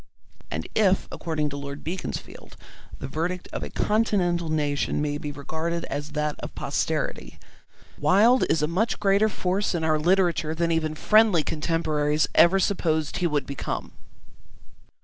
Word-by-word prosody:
And -, -, -4 dB
if, 195 Hz, -3 st, +2 dB
according 155 Hz, -3 st, -2 dB
to 140 Hz, -, -5 dB
Lord 140 Hz, 0 st, -7 dB
Beaconsfield, 180 Hz, +4 st, -6 dB, 0.4 s
the -, -, -6 dB
verdict 170 Hz, +6 st, -3 dB
of -, -, -3 dB
a -, -, -5 dB
continental 180 Hz, -6 st, +1 dB
nation 145 Hz, -2 st, 0 dB
may 145 Hz, 0 st, -1 dB
be 150 Hz, -, -5 dB
regarded 160 Hz, +4 st, -3 dB
as 145 Hz, +1 st, -4 dB
that 150 Hz, -1 st, -2 dB
of -, -, -8 dB
posterity, -, -, -2 dB, 0.6 s
Wilde 210 Hz, -, +5 dB
is 155 Hz, -, +2 dB
a -, -, +2 dB
much 195 Hz, +8 st, 0 dB
greater 205 Hz, +1 st, +3 dB
force 190 Hz, 0 st, -1 dB
in 165 Hz, -, -2 dB
our 155 Hz, -1 st, +2 dB
literature 170 Hz, -2 st, +2 dB
than 170 Hz, +1 st, 0 dB
even 155 Hz, -1 st, 0 dB
friendly 215 Hz, -2 st, +4 dB
contemporaries 155 Hz, -1 st, 0 dB
ever 170 Hz, +3 st, +6 dB
supposed 160 Hz, -5 st, 0 dB
he 180 Hz, -, +1 dB
would 150 Hz, -3 st, -1 dB
become. 140 Hz, -, -5 dB
160 Hz, 150 wpm, -25 LUFS, 150-185 Hz, 0.6 s, ever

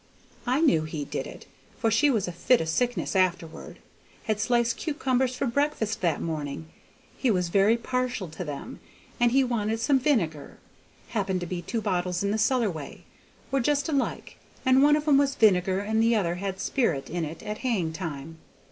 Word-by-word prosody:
I 255 Hz, +5 st, +2 dB
knew 275 Hz, -, +4 dB
he 155 Hz, -2 st, -5 dB
did -, -, -4 dB
it, -, -, -11 dB, 0.3 s
for 225 Hz, -, +1 dB
she 295 Hz, -, +4 dB
had 225 Hz, -10 st, +1 dB
a -, -, -3 dB
fit 235 Hz, +8 st, +3 dB
o' -, -, -1 dB
sickness 240 Hz, +7 st, -1 dB
afterward. 180 Hz, -3 st, -1 dB, 0.5 s
Had 215 Hz, -1 st, -1 dB
sliced 235 Hz, +1 st, +1 dB
cucumbers 265 Hz, -5 st, 0 dB
for -, -, -1 dB
breakfast 235 Hz, -4 st, -1 dB
that 170 Hz, -5 st, +1 dB
morning; 155 Hz, -1 st, -4 dB, 0.5 s
he 260 Hz, -, +2 dB
was 180 Hz, -5 st, +1 dB
very 200 Hz, +5 st, +4 dB
partial 250 Hz, -4 st, -2 dB
to 160 Hz, +4 st, -6 dB
them, 150 Hz, -, -7 dB, 0.4 s
and 240 Hz, -1 st, +4 dB
he 270 Hz, +2 st, +4 dB
wanted 225 Hz, -3 st, -1 dB
some 270 Hz, +4 st, +3 dB
vinegar. 190 Hz, -, -1 dB, 0.5 s
Happened 190 Hz, -4 st, -1 dB
to -, -, -3 dB
be 175 Hz, 0 st, -4 dB
two 230 Hz, +5 st, -3 dB
bottles 180 Hz, -3 st, -1 dB
in 200 Hz, -, 0 dB
the 220 Hz, -, 0 dB
cellar 235 Hz, -2 st, +2 dB
way; 155 Hz, -4 st, -9 dB, 0.5 s
were 275 Hz, -, +2 dB
just 285 Hz, +4 st, +1 dB
alike, 280 Hz, -4 st, -2 dB, 0.3 s
and 260 Hz, +1 st, +5 dB
one 295 Hz, +1 st, +6 dB
of 300 Hz, 0 st, -2 dB
'em 280 Hz, -2 st, +6 dB
was 280 Hz, -1 st, +1 dB
vinegar 190 Hz, -3 st, +3 dB
and 220 Hz, +2 st, 0 dB
the 230 Hz, +1 st, +3 dB
other 175 Hz, -6 st, +1 dB
had 190 Hz, +1 st, -4 dB
sperrit 165 Hz, -, 0 dB
in 175 Hz, 0 st, -3 dB
it 160 Hz, +1 st, -6 dB
at 210 Hz, 0 st, -5 dB
haying 195 Hz, -11 st, -1 dB
time. 160 Hz, -2 st, -6 dB
215 Hz, 190 wpm, -26 LUFS, 175-255 Hz, 0.5 s, one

